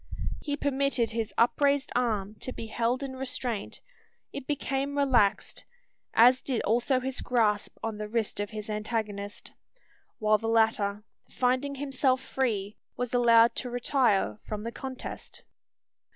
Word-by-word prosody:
He 290 -1 -2
permitted 275 -4 +1
his 225 -2 -2
upraised 280 +4 +3
arm 215 -5 0
to 255 - -5
be 230 - -6
held 235 +4 -1
in 265 -1 -5
restraint; 250 -4 -3 0.5
it 280 -2 -6
became 280 -1 -2
relaxed, 255 -8 +2 0.5
as 250 +3 +6
did 255 -4 -1
also 240 +4 +2
his 265 +1 -3
grasp 215 -4 +1
on 220 -2 -3
the 210 - -4
wrist 220 -2 -1
of 205 0 -2
his 215 -1 -6
antagonist; 210 -2 -4 0.7
while 215 0 +3
the 225 - -4
latter, 220 -2 +2 0.3
finding 255 +3 0
himself 265 -1 +1
free, 225 -7 -2 0.2
was 245 -1 -3
allowed 235 -1 +6
to 250 - -1
retire 245 -4 +1
from 210 -1 -5
the 230 - -4
contest. 260 +1 -7
240 Hz, 135 wpm, -28 LUFS, 215-265 Hz, 0.7 s, as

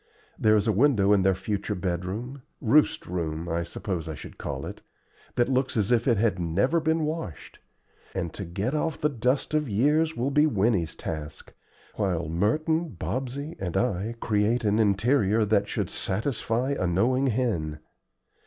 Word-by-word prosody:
There 110 0 +4
is 105 -1 +2
a 110 - +3
window 105 -3 +4
in 100 - +4
their 95 0 +3
future 100 +2 -3
bedroom 95 +9 -3 0.2
roost 145 +7 +3
room 85 -2 -3
I 85 0 -1
suppose 85 -1 -4
I 80 - -4
should - - -11
call - - -4
it - - -8 0.5
that 120 - +3
looks 130 -1 0
as 105 +1 +1
if 120 0 +3
it 120 -4 +4
had 105 -3 +1
never 100 - +1
been 160 0 +1
washed, 155 - -5 0.6
and 85 -4 -2
to 100 - -5
get 95 - -3
off 155 0 -1
the 150 - +2
dust 130 +2 0
of 150 -4 +1
years 150 +9 +2
will 130 +4 0
be 150 +2 +4
Winnie's 100 - +1
task, 75 -2 -6 0.4
while 90 -5 0
Merton, 150 - 0
Bobsey, 135 +5 -3
and 90 -3 -2
I 115 -1 0
create 110 +3 +1
an 105 0 +2
interior 110 +1 +3
that 105 -1 +2
should - - -2
satisfy 115 +4 -1
a 115 -10 0
knowing 125 +10 +2
hen. 105 -12 -1
110 Hz, 165 wpm, -26 LUFS, 95-130 Hz, 0.6 s, There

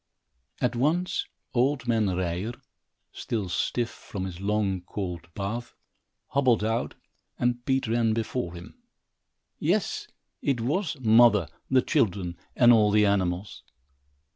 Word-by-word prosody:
At 125 0 0
once, 160 +9 0 0.3
old 130 +1 +1
man 115 -3 +2
Ryer, 90 +4 -2 0.6
still 105 -5 -3
stiff 120 +6 -1
from 95 -2 -6
his 90 -1 -7
long, 100 -2 0
cold 90 -2 -6
bath, 115 +4 -4 0.5
hobbled 130 -6 +3
out, 115 +2 -1 0.4
and 120 0 0
Pete 135 -1 +1
ran 115 0 +2
before 110 -5 -3
him. 85 +1 -12 0.8
Yes, - - 0 0.3
it 135 -4 0
was 150 - -1
mother, 110 -6 +5 0.2
the 130 -1 +4
children 90 -4 0 0.2
and 120 -1 +7
all 105 -2 +5
the 105 0 +4
animals! 95 -1 0
110 Hz, 120 wpm, -27 LUFS, 95-120 Hz, 0.8 s, and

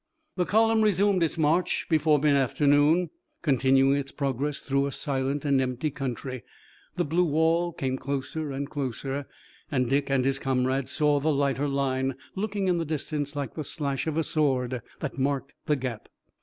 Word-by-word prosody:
The 180 - +1
column 225 +1 +4
resumed 200 -2 +3
its 165 0 0
march 160 +3 +1
before 155 -2 +3
mid 145 0 +3
afternoon, 145 +5 +3 0.3
continuing 135 -1 +3
its 140 -1 -4
progress 140 +1 -2
through 140 0 0
a - - -4
silent 140 +1 -2
and 140 -2 +3
empty 130 +4 -2
country. 130 -2 -4 0.5
The - - 0
blue 165 +5 +2
wall 165 +2 +2
came 130 -4 -3
closer 140 +2 -3
and 140 +1 -3
closer 140 0 -4 0.4
and 130 -3 +1
Dick 140 +2 +1
and 135 -2 +2
his 135 0 +1
comrade 130 0 0
saw 145 0 +2
the 155 +3 +1
lighter 140 0 +1
line, 135 -1 0 0.2
looking 200 -1 -2
in 175 -2 +2
the - - 0
distance 150 -1 -3
like 140 -5 -3
the 155 - -4
slash 140 -1 -3
of 160 -1 -1
a 165 - +2
sword, 130 -6 0 0.2
that 145 -2 -4
marked 140 0 -1
the 150 - +3
gap. 125 -5 -5
140 Hz, 170 wpm, -27 LUFS, 135-155 Hz, 0.5 s, column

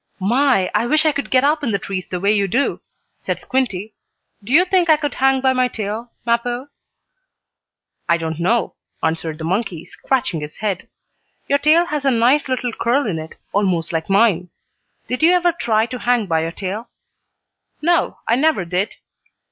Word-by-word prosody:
"My, 230 -1 +2
I 215 +3 +1
wish 310 +4 +2
I 310 - +5
could 280 -1 -4
get 255 0 +3
up 300 +1 +2
in 260 - 0
the 200 - +1
trees 190 -2 -5
the 180 - -4
way 200 +3 +2
you 200 -2 +1
do," 255 +9 0 0.4
said - - -3
Squinty. 220 -6 -2 0.5
"Do 215 - -8
you 340 +6 +6
think 360 -2 +2
I 310 - +6
could 295 -1 -3
hang 265 0 +2
by 260 0 +3
my 255 -1 +2
tail, 225 +1 -5
Mappo?" 240 +3 -1 1.4
"I 170 - +4
don't 160 -1 -4
know," 225 +7 +1 0.3
answered 160 -1 -1
the 160 - -7
monkey, 180 -1 -2
scratching 260 - -2
his 150 0 -7
head. 205 -4 -3 0.6
"Your 280 - +2
tail 315 +4 +4
has 300 -4 -3
a 275 - +3
nice 255 +4 +3
little 250 -2 -2
curl 250 +6 +1
in 175 -7 -2
it, 160 +1 -9 0.2
almost 185 -4 0
like 165 +1 -2
mine. 195 -4 +3 0.6
Did 250 - -3
you 335 +3 +6
ever 355 -1 +3
try 225 -9 +1
to 250 +1 -6
hang 245 -3 +1
by 165 -3 +1
your 165 +1 -2
tail?" 200 +6 -5 0.9
"No, 345 +1 +2
I 230 - +3
never 295 - +2
did." 180 +4 -2
235 Hz, 185 wpm, -19 LUFS, 185-270 Hz, 1.4 s, you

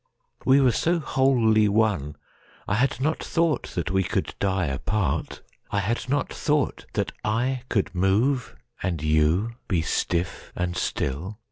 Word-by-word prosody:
We 135 +1 +6
were 130 -2 +5
so 170 +9 +1
wholly 120 -8 +3
one 100 -9 +1 0.5
I - - 0
had 125 +6 +1
not 155 +4 0
thoughtThat 165 - -1
we 95 0 +2
could - - -2
die 95 -2 +1
apart. 75 +3 -2 0.3
I 100 - 0
had 115 +5 -2
not 145 0 0
thoughtThat 150 -2 -1
I 125 +4 0
could 100 -4 0
move,—and 100 - -1
you 80 +9 +2
be 85 -4 +1
stiff 85 +2 -2
and 90 0 -2
still! 90 +7 -2
105 Hz, 130 wpm, -25 LUFS, 90-130 Hz, 0.5 s, We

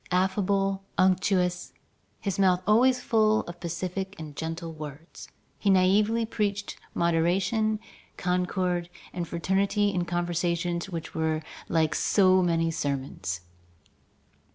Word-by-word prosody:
Affable, 195 +1 +1
unctuous, 185 -1 +2 0.5
his 200 -1 -3
mouth 185 -2 +3
always 250 +4 +4
full 220 -2 +3
of 175 0 -9
pacific 185 +2 -4
and 155 -2 -8
gentle 165 +1 -4
words, 155 +1 -9 0.3
he 205 - +1
naïvely 205 +4 +3
preached 205 -2 -2 0.2
moderation, 185 +6 +1 0.4
concord, 180 -1 0 0.2
and 175 -2 -3
fraternity 195 +4 +1
in 180 -3 -1
conversations 175 0 -1
which 165 -3 -6
were 160 -1 -1 0.3
like 160 -2 +2
so 185 -2 +4
many 165 -2 +1
sermons. 135 - -3
180 Hz, 105 wpm, -27 LUFS, 170-195 Hz, 0.5 s, always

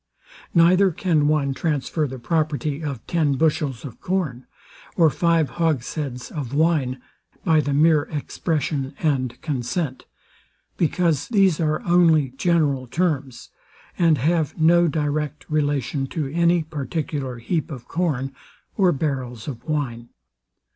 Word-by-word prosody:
Neither 180 +3 +5
can 160 -4 +1
one 145 -3 +1
transfer 150 +1 -1
the 130 0 -7
property 150 +1 -1
of 140 -7 -5
ten 155 -4 +1
bushels 145 -4 0
of 125 - -10
corn, 155 -10 -2 0.5
or 165 -4 +5
five 165 -5 +2
hogsheads 140 -4 -2
of 140 -4 -5
wine, 145 -5 +1 0.5
by 160 -3 +4
the 145 - -2
mere 155 0 +4
expression 150 -2 -2
and 130 -5 -1
consent; 135 0 -3 0.7
because 165 -3 +1
these 195 -7 +3
are 155 -2 0
only 165 -5 +4
general 140 -2 +1
terms, 140 -5 -2 0.5
and 165 -3 +3
have 160 +3 0
no 170 +2 +5
direct 150 -1 -2
relation 145 -2 0
to 155 +1 -3
any 170 0 +3
particular 145 -3 -4
heap 155 +7 -2
of 125 -6 -8
corn, 140 -6 -1 0.4
or 190 -4 +4
barrels 130 -6 -3
of 125 -4 -6
wine. 125 -6 -3
150 Hz, 125 wpm, -23 LUFS, 135-165 Hz, 0.7 s, Neither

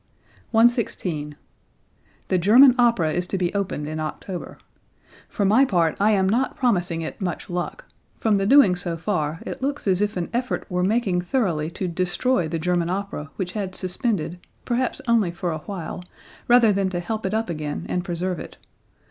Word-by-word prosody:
116. 205 - +1 0.9
"The 185 - +2
German 240 +9 +7
Opera 230 -10 +3
is 180 0 -1
to 195 - -2
be 180 -1 -1
opened 185 -7 -2
in 155 +1 -4
October. 170 +3 -6 0.7
For 205 - -1
my 220 +7 +5
part 170 - +2
I 205 +2 +4
am 195 -3 +3
not 245 +7 +1
promising 180 -9 0
it 160 - -7
much 175 -1 -4
luck. 180 - -4 0.3
From 215 -2 +2
the 195 0 0
doings 205 -9 +6
so 170 -2 -3
far 160 -3 -2
it - - -6
looks 285 +2 -2
as 190 -1 +2
if 210 -1 0
an 175 - -3
effort 250 +2 -2
were 180 0 0
making 195 -3 +1
thoroughly 175 - 0
to 185 - -2
destroy 180 +4 0
the 165 +1 -2
German 175 +1 0
opera 185 -6 -4
which 180 -2 -3
had 190 -2 -4
suspended, 180 -3 -1 0.3
perhaps 255 +2 -1
only 230 -6 +3
for 175 0 -3
a 160 - -3
while, 180 0 -6 0.4
rather 240 -3 +6
than 195 -1 0
to 180 -2 -3
help 215 +5 -4
it 190 +3 -1
up 225 +1 0
again 150 -3 -4
and 180 - -1
preserve 175 0 -3
it. - - -9
185 Hz, 180 wpm, -23 LUFS, 170-220 Hz, 0.9 s, German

